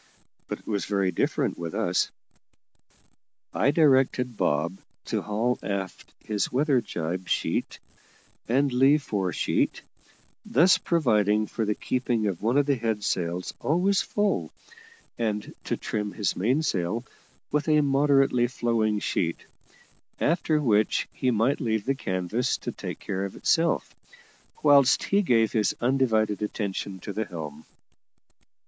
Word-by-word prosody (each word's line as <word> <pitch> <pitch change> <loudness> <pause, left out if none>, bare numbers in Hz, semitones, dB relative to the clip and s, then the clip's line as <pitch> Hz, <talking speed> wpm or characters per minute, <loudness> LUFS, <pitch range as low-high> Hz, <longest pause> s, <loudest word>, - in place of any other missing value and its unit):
But - - -4
it - - -23
was 105 -3 -2
very 100 -2 0
different 85 - -1
with 85 -2 -5
us. - - +1 1.4
I - - +2
directed 130 -5 +3
Bob 85 +2 0 0.3
to - - -1
haul 110 +4 -1
aft 95 -2 -5
his 105 -2 -1
weather 135 -1 +2
jib 90 -2 -4
sheet - - -1 0.7
and 135 +3 +2
lee 135 +4 +5
fore 100 -10 -2
sheet, - - 0 0.6
thus 185 +7 +4
providing 110 - +2
for 110 +1 -3
the 105 0 0
keeping 120 -3 -1
of 95 -4 -2
one 115 +6 +1
of 145 - +4
the 140 -2 +1
head 110 -3 -2
sails 90 -1 -2
always 185 +6 +2
full, 200 - -1 0.7
and 105 -2 -2
to - - -1
trim 105 -1 -3
his 105 -5 -1
mainsail 115 - 0 0.5
with 150 +1 0
a 150 -1 +5
moderately 135 -3 +3
flowing 115 -3 0
sheet; 85 -4 -2 0.7
after 160 -1 +1
which 110 -7 +2
he 130 - 0
might 120 +4 +1
leave 110 -4 -1
the 135 - +2
canvas 95 0 -1
to - - -5
take - - -6
care 95 -1 -4
of 100 - -5
itself, 165 0 +1 0.7
whilst 140 -3 +5
he 200 +1 +2
gave 115 - +2
his 105 -4 +1
undivided 115 -5 +1
attention 100 -2 -3
to 100 - -6
the 110 +2 -2
helm. 80 -5 -8
115 Hz, 135 wpm, -26 LUFS, 100-135 Hz, 1.4 s, lee